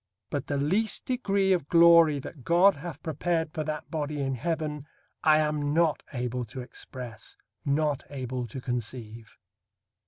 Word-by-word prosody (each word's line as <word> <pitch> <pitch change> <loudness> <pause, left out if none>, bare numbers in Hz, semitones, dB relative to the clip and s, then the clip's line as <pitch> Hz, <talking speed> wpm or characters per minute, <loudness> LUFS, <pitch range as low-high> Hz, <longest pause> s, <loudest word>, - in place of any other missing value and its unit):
But 145 -1 -2
the 145 - -1
least 195 +10 0
degree 200 -6 +1
of 170 -6 -1
glory 170 -3 +7
that 135 0 -8
God 180 +7 +5
hath 160 0 -8
prepared 160 0 -1
for 155 - -2
that 155 0 -5
body 150 -2 -2
in 135 -1 -1
heaven, 150 +1 -3 0.4
I 155 -1 +6
am 150 -1 0
not 165 -2 +3
able 125 -2 -2
to 125 +4 -7
express, 120 -2 -8 0.3
not 145 -1 +1
able 130 -3 -4
to 125 +4 -7
conceive. 115 -3 -5
150 Hz, 150 wpm, -28 LUFS, 130-165 Hz, 0.4 s, glory